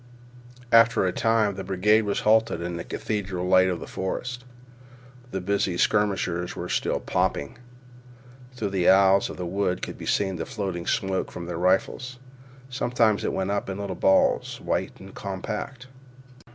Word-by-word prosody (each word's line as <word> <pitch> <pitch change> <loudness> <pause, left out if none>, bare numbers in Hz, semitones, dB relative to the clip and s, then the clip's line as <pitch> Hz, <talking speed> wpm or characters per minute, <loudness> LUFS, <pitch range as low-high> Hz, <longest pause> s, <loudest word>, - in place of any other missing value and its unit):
After 115 -3 +5
a 90 - +1
time 110 0 +2
the 95 0 -6
brigade 105 +3 +2
was 100 - -1
halted 110 -3 +3
in 85 0 -4
the 85 - -5
cathedral 95 -4 -3
light 95 0 +5
of 90 -2 -3
a - - -7
forest. 125 +6 -4 0.9
The 95 - -3
busy 95 -1 0
skirmishers 95 -4 0
were - - -5
still - - 0
popping. 70 +10 -1 1.0
Through 105 -5 -3
the 95 -3 +2
aisles 95 0 +5
of - - -8
the 90 - -4
wood 90 0 -1
could - - -6
be - - -7
seen 95 -3 0
the 80 - -4
floating 95 -5 -4
smoke 95 -1 -1
from 85 - -7
their 85 -1 -5
rifles. 95 +8 0 0.5
Sometimes 120 -4 +1
it - - 0
went 95 +1 -2
up 100 -1 -2
in 95 - -4
little 100 -2 -4
balls, 95 +2 +2
white - - -2
and 95 0 -12
compact. 105 +6 -5
95 Hz, 165 wpm, -25 LUFS, 90-110 Hz, 1.0 s, After